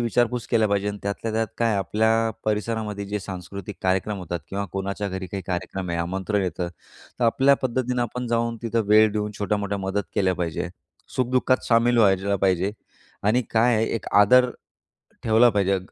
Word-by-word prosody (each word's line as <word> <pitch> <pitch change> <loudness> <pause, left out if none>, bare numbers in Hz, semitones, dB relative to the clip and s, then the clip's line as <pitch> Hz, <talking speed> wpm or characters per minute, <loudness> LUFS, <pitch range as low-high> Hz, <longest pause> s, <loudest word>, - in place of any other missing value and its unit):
विचारपूस 120 +1 0
केल्या 110 -3 +3
पाहिजे 100 0 0
आणि 105 0 -4
त्यातल्या 100 +2 -3
त्यात 110 0 0
काय 115 -2 +2
आपल्या 110 +4 +1
परिसरामध्ये 105 -1 -2
जे 105 +1 -2
सांस्कृतिक 95 +1 -7
कार्यक्रम 95 +2 0
होतात 85 -2 -4
किंवा 100 +1 -3
कोणाच्या 100 +1 -3
घरी 95 0 -5
काही 95 +2 -5
कार्यक्रम 90 0 -3
आहे 85 - -1
आमंत्रण 95 +4 -1
येतं, 90 0 -2 0.5
तर - - +3
आपल्या 135 +4 +4
पद्धतीनं 125 -1 0
आपण 125 +1 -4
जाऊन 115 0 0
तिथं 115 -1 0
वेळ 110 0 +6
देऊन 105 0 -2
छोट्या-मोठ्या 100 -1 -1
मदत 95 +1 -1
केल्या 95 -3 +2
पाहिजे. 85 -3 -3 0.5
सुख-दुःखात 130 0 +1
सामील 120 +1 +4
व्हायला 100 -1 +3
पाहिजे 95 +1 +1 0.5
आणि 115 +5 +2
काय 115 +1 +3
आहे 110 - +1
एक 115 - -4
आदर 125 +4 +5 0.7
ठेवला 115 +2 +5
पाहिजे, 100 -2 +1
105 Hz, 165 wpm, -24 LUFS, 95-115 Hz, 0.7 s, वेळ